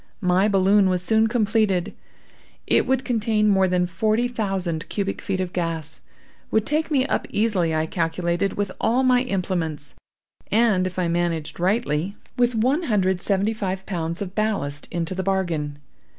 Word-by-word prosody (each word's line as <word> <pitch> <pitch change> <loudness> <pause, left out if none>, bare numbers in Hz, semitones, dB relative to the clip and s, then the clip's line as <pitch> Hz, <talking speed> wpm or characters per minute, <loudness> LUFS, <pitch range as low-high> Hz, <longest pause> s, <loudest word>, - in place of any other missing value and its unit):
My 185 +2 +3
balloon 195 0 +4
was 180 -1 0
soon 220 +3 +3
completed. 215 -4 +1 0.7
It - - +2
would 265 0 +1
contain 220 -2 +1
more 190 -2 +4
than 180 -1 +1
forty 215 +7 +1
thousand 195 -8 -2
cubic 195 -1 -2
feet 190 -1 -2
of 185 -1 -3
gas; 165 -3 -2 0.5
would 220 0 +1
take 310 +2 0
me 270 -4 +2
up - - -1
easily, 195 -7 +1
I 155 0 +1
calculated, 170 +3 -1
with 200 -2 -2
all 250 +4 +2
my 250 -1 +4
implements, 175 - -2 0.6
and, 210 -4 +3
if 185 - -7
I 180 -2 +1
managed 170 -2 -1
rightly, 190 -2 0 0.2
with 245 -1 +2
one 260 +9 +2
hundred 195 -4 +3
and 180 -1 -3
seventy 200 +3 +1
five 190 -3 -3
pounds 170 -1 -3
of 185 -1 -8
ballast 200 -10 -1
into 170 +1 -2
the 190 - -2
bargain. 175 -7 -1
190 Hz, 165 wpm, -23 LUFS, 175-220 Hz, 0.7 s, balloon